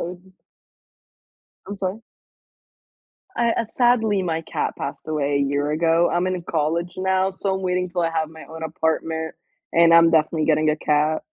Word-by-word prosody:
would 180 Hz, +2 st, -8 dB, 1.3 s
I'm 200 Hz, +1 st, -6 dB
sorry? 195 Hz, +2 st, -3 dB, 1.4 s
I 235 Hz, -1 st, +2 dB
uh, 230 Hz, -, -1 dB
sadly, 225 Hz, -4 st, +2 dB
my 165 Hz, -2 st, -2 dB
cat -, -, -3 dB
passed -, -, -6 dB
away 145 Hz, -2 st, -1 dB
a 140 Hz, -, +2 dB
year 145 Hz, +1 st, 0 dB
ago, 165 Hz, +2 st, +2 dB
I'm 175 Hz, +1 st, +1 dB
in 185 Hz, -2 st, -2 dB
college 165 Hz, +2 st, -1 dB
now, 190 Hz, 0 st, +1 dB
so 190 Hz, 0 st, -2 dB
I'm 190 Hz, -, -4 dB
waiting 180 Hz, 0 st, -1 dB
till 175 Hz, -1 st, -2 dB
I 165 Hz, -, +1 dB
have 160 Hz, -1 st, -1 dB
my 160 Hz, 0 st, -12 dB
own 160 Hz, 0 st, -9 dB
apartment, 160 Hz, 0 st, -2 dB, 0.4 s
and 170 Hz, 0 st, +5 dB
I'm 165 Hz, 0 st, +7 dB
definitely 155 Hz, 0 st, +2 dB
getting 155 Hz, 0 st, +3 dB
a 155 Hz, -, 0 dB
cat. 150 Hz, +1 st, +1 dB
165 Hz, 170 wpm, -22 LUFS, 155-185 Hz, 1.4 s, I'm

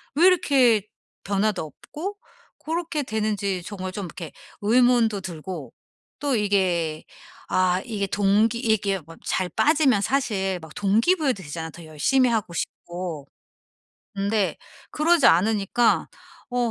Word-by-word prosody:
왜 330 Hz, -, +5 dB
이렇게 255 Hz, -, +4 dB, 0.4 s
변화도 200 Hz, -3 st, 0 dB
없고 355 Hz, -, -7 dB, 0.4 s
고렇게 320 Hz, -2 st, -2 dB
되는지 210 Hz, -5 st, -2 dB
정말 185 Hz, -2 st, -5 dB
좀 200 Hz, -2 st, -4 dB
이렇게 170 Hz, -1 st, -8 dB, 0.3 s
의문도 230 Hz, -2 st, +3 dB
들고. 180 Hz, 0 st, -7 dB, 0.5 s
또 285 Hz, -3 st, 0 dB
이게 180 Hz, -7 st, 0 dB, 0.5 s
아 185 Hz, 0 st, +2 dB
이게 210 Hz, -4 st, -2 dB
동기 205 Hz, +4 st, +2 dB
이게 205 Hz, -5 st, +1 dB
뭐 165 Hz, +1 st, -14 dB
잘 185 Hz, -1 st, -1 dB
빠지면 290 Hz, -9 st, +3 dB
사실 195 Hz, -8 st, 0 dB
막 160 Hz, -1 st, -12 dB
동기 220 Hz, -, +3 dB
부여도 270 Hz, -, -1 dB
되잖아 160 Hz, +2 st, -6 dB
더 170 Hz, -, -12 dB
열심히 245 Hz, -, +2 dB
하고 215 Hz, -6 st, -1 dB
싶고. 170 Hz, -4 st, -5 dB, 0.9 s
근데 200 Hz, +1 st, 0 dB, 0.4 s
그러지 320 Hz, -1 st, +4 dB
않으니까 210 Hz, +5 st, +3 dB, 0.4 s
어 245 Hz, -1 st, 0 dB
205 Hz, 250 characters per minute, -24 LUFS, 185-245 Hz, 0.9 s, 왜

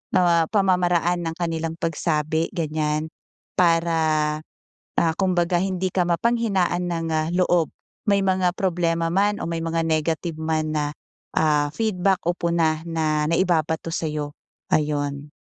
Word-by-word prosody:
ah, 170 Hz, -3 st, +4 dB
pamamaraan 180 Hz, -3 st, +2 dB
ng 165 Hz, -, -3 dB
kanilang 165 Hz, -1 st, -2 dB
pagsabi, 160 Hz, -1 st, 0 dB
ganyan, 155 Hz, -1 st, -1 dB, 0.5 s
para, 160 Hz, -3 st, +2 dB, 0.6 s
ah, 165 Hz, -1 st, +2 dB
kumbaga 175 Hz, -2 st, +2 dB
hindi 185 Hz, 0 st, -1 dB
ka 180 Hz, -1 st, +1 dB
mapanghinaan 190 Hz, -2 st, +1 dB
ng, 165 Hz, -1 st, -2 dB
ah, 155 Hz, 0 st, +1 dB
loob 175 Hz, -3 st, +3 dB, 0.4 s
may 200 Hz, -1 st, +3 dB
mga 185 Hz, -2 st, +1 dB
problema 170 Hz, -3 st, 0 dB
man 205 Hz, +3 st, +2 dB
o -, -, -2 dB
may 165 Hz, 0 st, -2 dB
mga 165 Hz, 0 st, 0 dB
negative 160 Hz, +1 st, -1 dB
man 155 Hz, -1 st, -1 dB
na, 150 Hz, -1 st, +1 dB, 0.5 s
ah, 150 Hz, -2 st, +3 dB
feedback 195 Hz, -4 st, +1 dB
o -, -, +4 dB
puna 170 Hz, -3 st, +1 dB
na 155 Hz, -2 st, 0 dB
naibabato 165 Hz, -1 st, +1 dB
sa'yo, 150 Hz, -3 st, -2 dB, 0.4 s
ayon. 145 Hz, -1 st, 0 dB
165 Hz, 130 wpm, -23 LUFS, 155-180 Hz, 0.6 s, ah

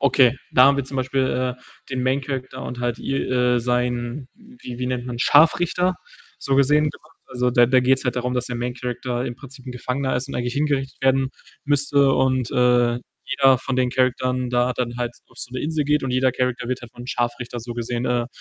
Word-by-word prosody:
Okay, 135 Hz, -2 st, +4 dB, 0.2 s
da 125 Hz, -, +7 dB
haben 140 Hz, +1 st, +5 dB
wir 140 Hz, -, -1 dB
zum 135 Hz, 0 st, -6 dB
Beispiel, 130 Hz, -1 st, 0 dB
äh, -, -, -24 dB, 0.3 s
den 130 Hz, -1 st, -2 dB
Main 130 Hz, +2 st, +1 dB
Character 130 Hz, -1 st, -5 dB
und 125 Hz, -, -6 dB
halt 120 Hz, -1 st, -1 dB
i 135 Hz, -, -3 dB
äh, 125 Hz, -2 st, +1 dB
sein 125 Hz, +2 st, -1 dB
wie 225 Hz, -, -11 dB
wie 125 Hz, -, -2 dB
nennt 125 Hz, -1 st, -3 dB
man 120 Hz, -1 st, -5 dB
Scharfrichter, 175 Hz, +6 st, +4 dB, 0.4 s
so 135 Hz, -1 st, 0 dB
gesehen 150 Hz, +2 st, +4 dB
gemacht. 155 Hz, +2 st, -18 dB
Also, 125 Hz, -1 st, 0 dB
da 120 Hz, 0 st, +5 dB
da 130 Hz, +1 st, +4 dB
geht‘s 130 Hz, +1 st, +2 dB
halt 125 Hz, -1 st, -1 dB
darum, 125 Hz, 0 st, -1 dB
dass 125 Hz, 0 st, -1 dB
der 120 Hz, -, -4 dB
Main 120 Hz, +1 st, -3 dB
Character 125 Hz, 0 st, -3 dB
im 125 Hz, -2 st, -4 dB
Prinzip 135 Hz, -1 st, -12 dB
'n 125 Hz, -, -5 dB
Gefangener 130 Hz, +2 st, -2 dB
ist 130 Hz, +2 st, -3 dB
und -, -, -7 dB
eigentlich 120 Hz, 0 st, -2 dB
hingerichtet 140 Hz, -2 st, -1 dB
werden 135 Hz, 0 st, +2 dB, 0.3 s
müsste 140 Hz, -1 st, +3 dB
und, 130 Hz, -2 st, +1 dB
äh, 120 Hz, -1 st, +3 dB, 0.3 s
jeder 135 Hz, -1 st, +4 dB
von 130 Hz, +1 st, -4 dB
den 125 Hz, -1 st, +2 dB
Charakteren 125 Hz, 0 st, 0 dB
da 125 Hz, 0 st, +1 dB
dann 120 Hz, 0 st, -3 dB
halt 120 Hz, -1 st, -2 dB, 0.2 s
auf -, -, -19 dB
so -, -, -7 dB
'ne 130 Hz, -, -2 dB
Insel 155 Hz, 0 st, -1 dB
geht 150 Hz, 0 st, +2 dB
und 135 Hz, -, -2 dB
jeder 130 Hz, +1 st, +2 dB
Character 125 Hz, -2 st, -2 dB
wird 130 Hz, 0 st, -3 dB
halt 120 Hz, -1 st, -11 dB
vom 120 Hz, 0 st, -10 dB
Scharfrichter 120 Hz, 0 st, -3 dB
so 120 Hz, +1 st, -6 dB
gesehen, 120 Hz, +1 st, -3 dB
äh, 120 Hz, -1 st, 0 dB
125 Hz, 220 wpm, -22 LUFS, 125-135 Hz, 0.4 s, da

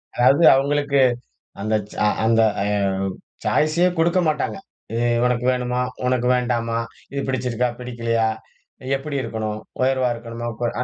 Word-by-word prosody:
அதாது 135 Hz, +6 st, +4 dB
அவங்களுக்கு 140 Hz, +1 st, +1 dB, 0.6 s
அந்த 110 Hz, +2 st, 0 dB, 0.2 s
ச -, -, -11 dB, 0.3 s
அந்த 115 Hz, 0 st, +4 dB, 0.2 s
அ -, -, -1 dB, 0.8 s
சாயிசே 155 Hz, +4 st, +3 dB
குடுக்கமாட்டாங்க. 170 Hz, 0 st, +1 dB, 0.4 s
எ -, -, 0 dB, 0.3 s
உனக்கு 125 Hz, 0 st, 0 dB
வேணுமா? 125 Hz, 0 st, -1 dB, 0.2 s
உனக்கு 125 Hz, -1 st, +1 dB
வேண்டாமா? 120 Hz, -2 st, 0 dB, 0.3 s
இது 140 Hz, -, -1 dB
பிடிச்சிருக்கா? 125 Hz, -2 st, 0 dB
பிடிக்கலையா? 115 Hz, -2 st, -1 dB, 0.7 s
எப்டி 140 Hz, +1 st, -4 dB
இருக்கணும்? 110 Hz, -2 st, -3 dB, 0.2 s
உயர்வா 130 Hz, -1 st, +2 dB
இருக்கணுமா? 115 Hz, 0 st, -6 dB
கோ -, -, +1 dB, 0.2 s
அ. -, -, +1 dB
125 Hz, 120 wpm, -22 LUFS, 115-140 Hz, 0.8 s, அதாது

